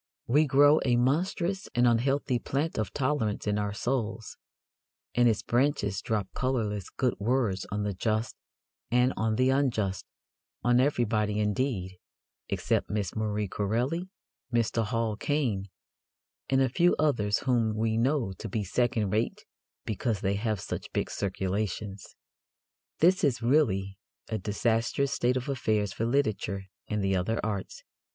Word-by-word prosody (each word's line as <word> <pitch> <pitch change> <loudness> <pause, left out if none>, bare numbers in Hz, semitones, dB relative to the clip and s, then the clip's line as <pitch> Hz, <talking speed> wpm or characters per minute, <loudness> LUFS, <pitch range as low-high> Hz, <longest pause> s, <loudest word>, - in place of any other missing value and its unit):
We 150 +5 +3
grow 145 +3 +6
a 125 -2 +3
monstrous 175 +9 0
and 120 0 +4
unhealthy 125 +2 +2
plant 145 +5 -2
of 105 -4 -2
tolerance 130 -7 -1
in 105 0 +1
our 105 0 -1
souls, 110 0 -2 0.8
and 120 -1 +4
its 110 - 0
branches 120 -6 +1
drop 105 -4 -1
colourless 110 -7 -1
good 125 -3 0
words 110 -4 0
on 105 +1 -1
the 105 -1 -1
just 110 +4 -1 0.5
and 125 +2 +3
on 110 0 0
the 130 +3 +3
unjust 115 -9 0 0.6
on 120 0 +4
everybody, 110 -6 +1
indeed, 105 -4 -1 0.5
except - - 0
Miss 105 -2 -2
Marie 105 -1 -1
Corelli, 120 - -1 0.4
Mr. 115 -1 +1
Hall 110 0 -1
Caine, 120 -9 -1 0.8
and 135 0 +3
a - - +3
few 175 +7 +3
others 110 -9 +2
whom 115 -4 +1
we 110 0 0
know 120 -3 +1
to 110 - -5
be 105 +2 -1
second 110 0 0
rate 110 +2 -1 0.4
because 110 -1 -1
they 95 - +1
have 105 0 -1
such - - -5
big - - -1
circulations. 100 +1 -3 0.9
This 180 +3 +4
is 125 -5 +1
really 105 -8 +2 0.3
a 110 - -2
disastrous 115 +6 0
state 125 +1 +1
of 130 +2 -4
affairs 110 -7 0
for 115 - -1
literature 110 -7 0 0.2
and 105 -1 -1
the 95 0 +2
other 95 +5 0
arts. 100 -3 -4
115 Hz, 145 wpm, -28 LUFS, 105-130 Hz, 0.9 s, grow